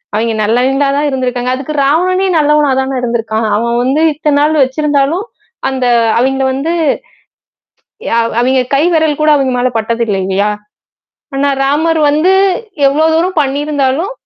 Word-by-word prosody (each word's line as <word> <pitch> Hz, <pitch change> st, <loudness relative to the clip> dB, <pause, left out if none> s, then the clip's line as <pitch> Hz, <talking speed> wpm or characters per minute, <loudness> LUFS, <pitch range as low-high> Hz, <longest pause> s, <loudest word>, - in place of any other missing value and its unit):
அவெங்க 225 Hz, +1 st, 0 dB
நல்லவங்களா 260 Hz, +6 st, +1 dB
தான் 295 Hz, 0 st, 0 dB
இருந்திருக்காங்க. 250 Hz, -2 st, -2 dB
அதுக்கு 280 Hz, +3 st, -6 dB
ராவணனே 370 Hz, +6 st, +1 dB
நல்லவனா 300 Hz, -1 st, +2 dB
தானே 265 Hz, 0 st, -3 dB
இருந்திருக்கான். 225 Hz, -2 st, -2 dB
அவன் 235 Hz, +2 st, -1 dB
வந்து 275 Hz, +5 st, 0 dB
இத்த 300 Hz, 0 st, -2 dB
நாள் 305 Hz, +2 st, +2 dB
வச்சிருந்தாலும், 290 Hz, -, 0 dB, 0.4 s
அந்த 260 Hz, -1 st, -2 dB, 0.3 s
அவெங்கள 265 Hz, +1 st, 0 dB
வந்து 305 Hz, +6 st, -2 dB, 1.4 s
அ -, -, +3 dB, 0.2 s
அவெங்க 260 Hz, +1 st, +2 dB
கை 280 Hz, -, +2 dB
விரல் 315 Hz, -2 st, +1 dB
கூட 305 Hz, 0 st, +3 dB
அங்க 270 Hz, -3 st, 0 dB
மேலபட்டதில்ல 230 Hz, -4 st, -1 dB
இல்லயா! 200 Hz, +2 st, 0 dB, 0.9 s
ஆனா 280 Hz, +1 st, +1 dB
ராமர் 315 Hz, +4 st, +1 dB
வந்து 315 Hz, +6 st, +2 dB, 0.5 s
எவ்ளோ 300 Hz, +3 st, +1 dB
தூரம் 345 Hz, 0 st, 0 dB
பண்ணியிருந்தாலும், 285 Hz, -, -1 dB
275 Hz, 130 wpm, -12 LUFS, 250-305 Hz, 1.4 s, அ